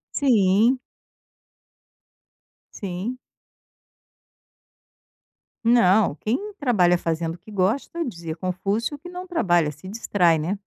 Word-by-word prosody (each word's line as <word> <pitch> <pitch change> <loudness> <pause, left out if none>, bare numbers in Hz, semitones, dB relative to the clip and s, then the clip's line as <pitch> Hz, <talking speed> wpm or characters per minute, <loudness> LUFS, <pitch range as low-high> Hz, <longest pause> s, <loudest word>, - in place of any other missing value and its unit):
Sim. 230 -1 +3 2.0
Sim. 200 +6 -4 2.5
Não. 215 - +4
Quem 385 - -3
trabalha 190 - +3
fazendo 165 0 -2
o - - -14
que 195 +5 -17
gosta, 215 - -1
dizia 170 -7 -6
Confúcio, 195 - -2
que 355 - -11
não 360 +1 -7
trabalha, 175 - +1
se 155 +6 -13
distrai, 185 -5 +2
né. 175 +7 -2
200 Hz, 95 wpm, -23 LUFS, 175-245 Hz, 2.5 s, Não